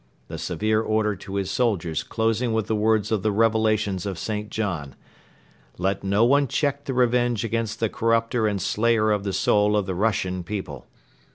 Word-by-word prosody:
The - - -6
severe 110 0 0
order 110 -1 0
to 95 +2 -8
his 100 -1 -2
soldiers 90 -10 0
closing 115 +5 -1
with 110 -2 0
the 110 - -1
words 110 0 +1
of 110 -3 +1
the 110 - +1
Revelations 110 -3 +1
of 95 - -4
St. 105 -1 -4
John: 90 -12 -3 0.8
"Let 95 +2 -1
no 100 +3 +3
one 140 +3 +3
check 145 +2 -1
the 135 - -3
revenge 120 -2 +2
against 115 -1 -2
the 115 - +1
corrupter 115 +1 +1
and 100 -2 -1
slayer 110 +2 +1
of 105 -2 0
the 100 - -2
soul 105 +2 +2
of 105 - 0
the 95 - -3
Russian 95 -2 -1
people. 85 -9 -6
110 Hz, 180 wpm, -24 LUFS, 100-115 Hz, 0.8 s, no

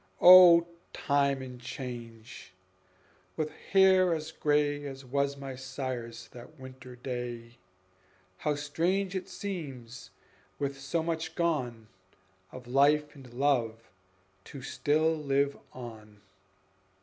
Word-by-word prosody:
O 175 -2 +9 0.3
Time 140 -1 +1
and 125 -1 -10
Change! 120 -5 -8 0.8
with 155 -1 -2
hair 190 -2 +3
as 155 0 -6
gray 145 -1 0
As 135 -1 -9
was 140 +2 -1
my 135 -1 -7
sire's 130 -3 -6
that 125 +5 -14
winter 130 -1 -11
day, 120 -1 -6 0.8
How 150 -1 0
strange 175 +7 -1
it 190 - -4
seems, 135 - -7 0.5
with 140 -1 -3
so 160 +5 -1
much 160 -1 -3
gone 125 -10 -1 0.6
Of 125 -1 -10
life 145 +4 +3
and 135 -5 -14
love, 120 -4 -1 0.5
to 135 -3 -10
still 155 +4 +1
live 140 -2 0 0.2
on! 110 -4 -11
140 Hz, 110 wpm, -29 LUFS, 125-155 Hz, 0.8 s, O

